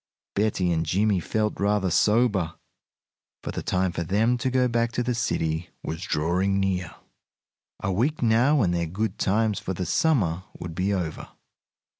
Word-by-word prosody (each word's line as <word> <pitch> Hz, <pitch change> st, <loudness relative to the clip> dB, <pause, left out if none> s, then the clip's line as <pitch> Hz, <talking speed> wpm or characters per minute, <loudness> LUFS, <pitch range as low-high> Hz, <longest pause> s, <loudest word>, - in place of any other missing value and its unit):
Betty 100 Hz, -4 st, +1 dB
and 80 Hz, -1 st, +1 dB
Jimmie 100 Hz, +3 st, +1 dB
felt 105 Hz, +4 st, -1 dB
rather 100 Hz, -2 st, +1 dB
sober, 105 Hz, -6 st, +2 dB, 0.9 s
for -, -, -4 dB
the -, -, -4 dB
time 90 Hz, 0 st, 0 dB
for 85 Hz, -, -3 dB
them 105 Hz, +8 st, +2 dB
to 130 Hz, -, 0 dB
go 130 Hz, 0 st, +2 dB
back 115 Hz, -1 st, 0 dB
to 125 Hz, -, 0 dB
the 125 Hz, +1 st, 0 dB
city 80 Hz, -7 st, -1 dB
was 80 Hz, +1 st, -4 dB
drawing 90 Hz, +4 st, 0 dB
near. 95 Hz, -3 st, -1 dB, 0.9 s
A 100 Hz, -, 0 dB
week 125 Hz, +10 st, 0 dB
now, 120 Hz, +5 st, +4 dB
and 90 Hz, -2 st, +1 dB
their 85 Hz, -1 st, 0 dB
good 105 Hz, +7 st, -3 dB
times 105 Hz, +1 st, +1 dB
for 95 Hz, -, -4 dB
the 90 Hz, -, -3 dB
summer 95 Hz, -, +1 dB, 0.2 s
would 85 Hz, -2 st, -6 dB
be 95 Hz, +4 st, 0 dB
over. 90 Hz, -5 st, -3 dB
100 Hz, 165 wpm, -25 LUFS, 90-115 Hz, 0.9 s, now